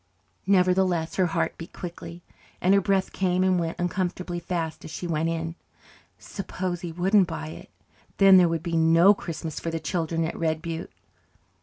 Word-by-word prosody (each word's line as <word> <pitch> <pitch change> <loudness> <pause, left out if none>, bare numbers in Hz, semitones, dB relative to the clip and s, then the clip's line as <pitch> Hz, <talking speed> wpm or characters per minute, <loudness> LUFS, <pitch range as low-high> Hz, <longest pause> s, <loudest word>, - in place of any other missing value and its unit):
Nevertheless 185 -3 +2
her 185 -2 +3
heart 165 - -2
beat 165 - -9
quickly, 175 -1 -8 0.4
and 185 - +3
her 200 - +5
breath 195 -1 0
came 185 -1 +1
and 185 -1 +3
went 165 -1 -3
uncomfortably 175 0 -2
fast 165 -2 -4
as - - -8
she 170 - -6
went 165 -1 0
in. 165 0 -3 0.6
Suppose 185 -3 -5
he 175 - -5
wouldn't 185 +3 +3
buy 160 -2 -5
it. - - -11 0.5
Then 195 -1 +8
there 175 -2 +5
would 165 -1 -2
be 170 -1 -2
no 165 +4 +6
Christmas 165 -5 -6
for 165 - -4
the 165 0 -3
children 165 +1 -1
at 160 - -4
Red 160 -1 -1
Butte. 165 0 -6
175 Hz, 175 wpm, -25 LUFS, 165-185 Hz, 0.6 s, Then